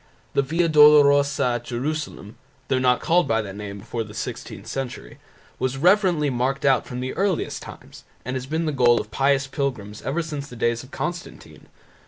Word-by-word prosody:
The - - +3
Via 165 +5 0
Dolorosa 145 -2 +6
at 120 -1 -1
Jerusalem 130 -4 -4 0.3
(though 130 -1 +2
not 125 -1 +2
called 175 +1 +2
by 115 - +2
that 100 -2 -8
name 100 -1 -7
before 115 +3 -4
the 105 -1 -12
sixteenth - - -6
century) 125 - -6 0.4
was 130 +1 -1
reverently 175 -3 +3
marked 130 +3 -1
out 135 -2 +3
from 125 0 -5
the 130 +1 -3
earliest 195 -1 -1
times - - -12 0.2
and 130 +2 -3
has 130 0 -4
been 160 +3 -1
the 155 - 0
goal 120 -4 +4
of 105 - -7
pious 135 +3 +2
pilgrims 125 -7 -4
ever 160 +5 -2
since 150 -3 -6
the 125 - -11
days 120 0 0
of 130 - -14
Constantine. 175 +4 -7
135 Hz, 185 wpm, -23 LUFS, 120-150 Hz, 0.4 s, Dolorosa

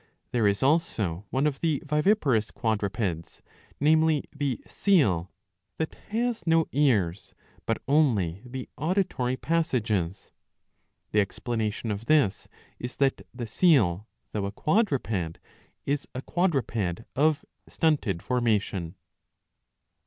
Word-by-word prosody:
There 115 -4 +2
is 100 +4 +1
also 110 - +1
one 135 +3 +1
of 145 -3 0
the 160 -4 +1
viviparous 150 - +2
quadrupeds, 100 -6 -2 0.4
namely 155 0 +3
the 140 -4 -1
seal, 105 - +2 0.5
that 160 - -2 0.2
has 235 0 -1
no 165 0 +4
ears 105 - +1 0.3
but 115 - +1
only 110 - +2
the 125 0 -7
auditory 155 -7 0
passages.^ 115 - -1 0.8
The 105 - +3
explanation 110 +1 -2
of 105 +3 -5
this 145 -11 +3 0.3
is 125 +1 -5
that 135 -1 +1
the 120 -1 -5
seal 110 - +3 0.2
though 100 -2 -2
a - - -4
quadruped 115 - 0 0.5
is 145 0 -1
a 130 - -4
quadruped 115 - 0
of 150 +2 +2 0.2
stunted 130 - 0
formation. 105 -8 0
125 Hz, 110 wpm, -27 LUFS, 100-155 Hz, 0.8 s, no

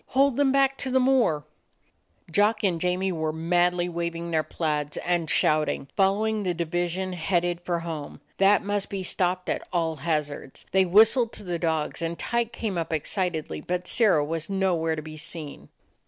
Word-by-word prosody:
Hold 275 -2 +4
them 280 0 +3
back 275 0 +3
to 265 - -2
the 260 0 +3
moor 250 - +2 0.4
!" - - -27
Jock 210 +5 +2
and 175 -5 +1
Jamie 180 +1 0
were 160 -2 -1
madly 175 +2 +1
waving 170 0 -4
their 160 -1 +2
plaids 150 -1 -2
and 175 -3 -1
shouting, 150 -2 +1
following 210 +2 +2
the 180 -3 -1
division 175 +2 -2
headed 175 0 0
for 175 -1 -2
home. 160 -4 -6 0.2
That 200 +2 +5
must 205 0 -2
be 195 -1 -4
stopped 180 0 0
at - - -1
all 165 -3 0
hazards. 150 -3 -3
They 190 0 +4
whistled 220 +5 +5
to - - -8
the 175 -3 -3
dogs, 160 -2 -1
and 165 0 -2
Tyke 235 -1 -1
came 215 -6 -3
up 165 - -4
excitedly; 160 0 -2
but 180 +2 -3
Sirrah 190 -9 +3
was 165 +2 -3
no 190 -1 +1
where 160 -1 0
to 155 - -6
be 155 0 -9
seen. 155 -1 -7
175 Hz, 180 wpm, -26 LUFS, 160-195 Hz, 0.4 s, That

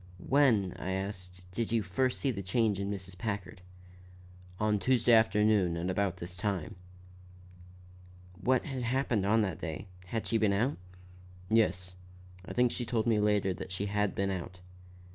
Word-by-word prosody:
"When," 125 -10 +3
I 95 - -3
asked, 90 -2 -5
"did 115 +4 -2
you 115 -2 +2
first 125 +8 0
see 135 - +1
the 100 -5 -4
change 100 +1 +1
in 100 0 -2
Mrs. 95 -2 -6
Packard?" 95 -2 -4 1.0
"On 105 -1 +2
Tuesday 120 0 +3
afternoon 105 -5 +4
at 90 +2 -1
about 95 -2 0
this 90 0 -7
time." 95 -2 -2 1.7
"What 130 -1 +2
had 135 -4 -4
happened 120 -4 0
on 110 +1 +4
that 95 - -3
day? 90 +4 -5 0.2
Had 115 +3 -3
she 115 - +1
been 105 -2 +3
out?" 120 +8 +1 0.7
"Yes, 90 -5 +2 0.5
I - - -9
think 125 -1 +3
she 125 - -3
told 115 -1 -1
me 115 -3 +3
later 105 -2 +2
that 90 - -8
she 95 +2 -2
had 105 0 0
been 100 0 0
out." 90 -1 -5
105 Hz, 160 wpm, -31 LUFS, 95-115 Hz, 1.7 s, afternoon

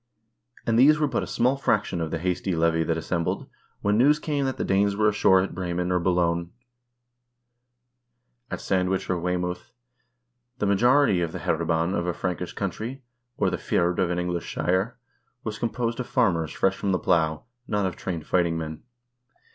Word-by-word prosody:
And 115 0 +2
these 150 +4 +7
were 150 - +3
but 130 -5 -1
a - - -5
small 125 +3 +1
fraction 105 -9 0
of 80 - -2
the 85 - -2
hasty 90 +2 -1
levy 80 0 +2
that 80 0 0
assembled, 85 +1 -2 0.3
when 105 +2 +2
news 145 +4 +5
came 145 -2 -1
that 130 - -2
the - - -2
Danes 100 +1 +2
were 105 +1 +3
ashore 95 -3 +4
at 95 - -3
Bremen 90 0 -2
or 90 - +2
Boulogne, 85 -1 +1 2.0
at - - -5
Sandwich 95 0 0
or 90 - 0
Weymouth. 90 +4 -3 0.9
The 105 - -1
majority 120 0 +4
of 85 -2 -2
the - - -3
hereban 80 +2 0
of 85 -3 -1
a 90 - 0
Frankish 90 -1 -3
county, 110 +7 -4 0.3
or - - +1
the - - -1
fyrd 85 0 0
of 90 - +2
an 90 - -1
English 90 -1 -2
shire, 95 +7 -1 0.5
was 110 -1 -5
com 120 - 0
posed 120 0 -2
of 125 - -3
farmers 85 - +1
fresh 95 0 +1
from 100 -1 -1
the - - +3
plow, 80 -4 +1 0.2
not 105 -1 0
of 90 -3 -2
trained 85 -5 -5
fighting 85 -2 +1
men. 80 -1 -5
90 Hz, 180 wpm, -25 LUFS, 85-110 Hz, 2.0 s, these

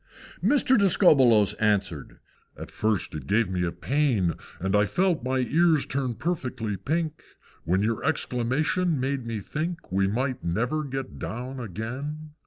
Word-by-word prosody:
III. - - +3
Mr. 265 -4 +4
Discobbolos 135 - +5
answered, 100 -8 0 0.4
"At - - -8
first 110 -5 -1
it 75 -4 -7
gave 105 -2 +2
me 90 -2 0
pain, 120 - +1 0.3
And 95 +3 0
I 105 0 +4
felt 180 - +1
my 130 +1 0
ears 160 +3 +3
turn 130 -3 -2
perfectly 125 - -3
pink 155 - -2 0.4
When 95 +4 +1
your 115 +1 -1
exclamation 155 +4 0
made 135 -2 -2
me 115 -3 -3
think 165 - -5
We 95 +1 +2
might 125 +5 -2
never 120 - -1
get 135 -1 -5
down 125 +3 -5
again! 130 - -5
125 Hz, 145 wpm, -26 LUFS, 105-155 Hz, 0.4 s, Discobbolos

